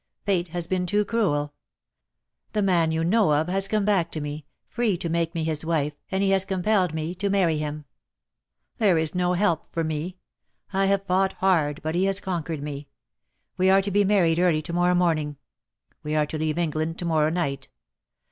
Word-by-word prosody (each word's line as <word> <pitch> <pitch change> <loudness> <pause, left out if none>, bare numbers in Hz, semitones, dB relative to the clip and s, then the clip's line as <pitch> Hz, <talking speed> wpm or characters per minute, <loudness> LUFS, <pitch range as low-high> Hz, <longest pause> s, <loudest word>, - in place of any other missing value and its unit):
"Fate 185 -4 +1
has 175 0 -3
been 180 0 -1
too 205 +2 +2
cruel. 150 -11 0 1.0
The 210 - +1
man 170 -4 +2
you 160 0 0
know 190 -2 +3
of 155 +3 +1
has 195 +1 0
come 215 -2 0
back 190 -5 +1
to 155 - -2
me, 150 0 -6 0.2
free 230 -6 0
to 170 -1 -4
make 170 +1 -1
me 165 - -1
his 155 -1 -2
wife, 155 -3 0 0.2
and 190 +1 0
he 195 - +2
has 190 -1 +3
compelled 190 -1 +1
me 160 +2 -3
to 195 +2 -2
marry 180 -6 +2
him. 150 0 -4 0.9
"There 200 -6 +4
is 160 -1 +1
no 180 0 +1
help 175 -4 0
for 165 - -1
me. 160 +4 -3 0.6
I 195 0 +2
have 195 0 +1
fought 190 0 +1
hard, 160 -6 +1
but 160 +1 -2
he 180 +3 +1
has 195 0 +2
conquered 165 -6 -4
me. 145 -1 -6 0.7
We 185 +1 +3
are 195 0 +5
to 200 - -2
be 205 +2 +3
married 180 -5 +3
early 170 -4 +2
to 170 - -6
morrow 175 +1 +2
morning. 155 -5 0 0.6
We 150 +1 -3
are 150 -1 +3
to 155 - -5
leave 155 0 -1
England 160 -1 -1
to 175 - -5
morrow 155 -2 +2
night. 140 -6 -2
175 Hz, 200 wpm, -25 LUFS, 155-190 Hz, 1.0 s, are